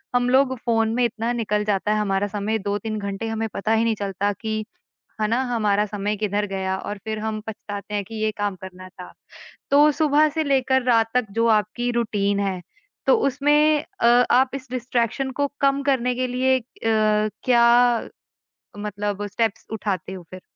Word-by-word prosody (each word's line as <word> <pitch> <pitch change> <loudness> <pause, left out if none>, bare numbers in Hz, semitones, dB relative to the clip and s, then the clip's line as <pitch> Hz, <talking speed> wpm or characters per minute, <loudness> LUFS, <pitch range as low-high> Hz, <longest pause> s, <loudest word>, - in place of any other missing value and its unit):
हम 245 0 +2
लोग 260 0 +3
फ़ोन 225 -1 +2
में 250 - +2
इतना 230 +1 -2
निकल 210 -3 -1
जाता 210 0 0
है 215 - +1
हमारा 200 -1 0
समय 210 +2 -2
2-3 210 +2 -3
घंटे 200 +2 -4
हमें 225 0 -2
पता 215 +2 -2
ही 225 +1 +3
नहीं 225 -1 +1
चलता 200 0 -1
कि 215 +1 -4 0.6
है 215 - +1
ना? 235 +3 +1
हमारा 210 -2 +2
समय 210 +1 -3
किधर 205 0 -1
गया 190 -1 -2
और 205 +1 -6
फिर 215 -1 -3
हम 215 0 -3
पछताते 210 -1 -7
हैं 205 - 0
कि 225 - -11
ये 215 - +2
काम 205 -1 -1
करना 185 0 -10
था। 180 -1 -12 0.6
तो 295 +2 +6
सुबह 305 0 +3
से 315 -1 0
लेकर 265 -2 +2
रात 225 -2 +2
तक 250 -3 +2
जो 230 - +3
आपकी 240 +4 -3
रूटीन 205 -4 0
है, 190 -2 -2 0.5
तो - - +5
उसमें 295 +2 +3 0.2
अ, 235 - +3 0.2
आप 255 +1 +4
इस 265 -2 -7
डिस्ट्रैक्शन 250 +1 -1
को 285 +2 -1
कम 275 0 +2
करने 250 -3 +1
के 255 +1 -1
लिए 260 +1 +2
अ, - - -13 0.2
क्या 215 +2 +2 1.2
मतलब 205 0 -3
स्टेप्स 220 +1 -2
उठाते 195 -3 -3
हो 180 -2 -8
फिर? 185 0 -9
220 Hz, 180 wpm, -23 LUFS, 205-250 Hz, 1.2 s, तो